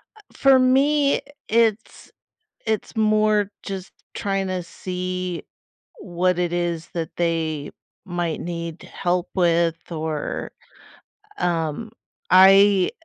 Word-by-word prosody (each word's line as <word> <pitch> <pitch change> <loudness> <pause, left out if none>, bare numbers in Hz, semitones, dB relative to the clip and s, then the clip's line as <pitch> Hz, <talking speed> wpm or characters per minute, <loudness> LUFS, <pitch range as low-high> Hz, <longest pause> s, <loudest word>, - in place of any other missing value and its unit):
Uh, 430 - -17
for 270 -1 +5
me, 275 +3 +3 0.3
it's 225 -1 0 0.6
it's 220 +1 -2
more 215 -1 +2
just 195 -2 -6 0.2
trying 195 -1 -1
to 185 -1 -2
see 180 0 -4 0.5
what 180 0 0
it 175 -1 0
is 170 -2 -2
that 165 -2 -3
they 160 -3 -1 0.4
might 175 -3 -2
need 170 -1 -5
help 180 0 -2
with, 170 -2 +2
or, 155 -2 -3 0.9
um, 165 +4 -1 0.4
I 195 +1 +6
180 Hz, 100 wpm, -22 LUFS, 170-210 Hz, 0.9 s, I